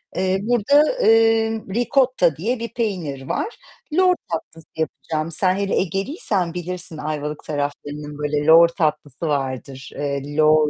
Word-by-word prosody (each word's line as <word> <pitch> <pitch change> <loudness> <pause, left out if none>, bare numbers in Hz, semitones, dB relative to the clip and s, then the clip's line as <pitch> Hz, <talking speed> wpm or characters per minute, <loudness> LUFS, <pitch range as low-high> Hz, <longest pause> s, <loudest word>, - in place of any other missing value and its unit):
Eee, 190 0 +1
burada, 280 - +3
eee, 225 0 +4
ricotta 245 - +2
diye 225 +9 -2
bir 235 - -5
peynir 170 - -3
var. 450 - -2 0.4
Lor 365 +1 +5 0.2
tatlısı 165 0 -6
yapacağım. 160 +1 -3
Sen 185 +3 +1
hele 200 0 -1
Egeliysen 195 - -1
bilirsin. 180 -1 -5
Ayvalık 150 0 -4
taraflarının, 145 0 -4
böyle, 150 0 -1
lor 165 +1 +8
tatlısı 155 -2 -2
vardır. 135 -1 -3
Eee, 145 0 -3
lor, 155 -1 +5
165 Hz, 130 wpm, -21 LUFS, 150-220 Hz, 0.4 s, lor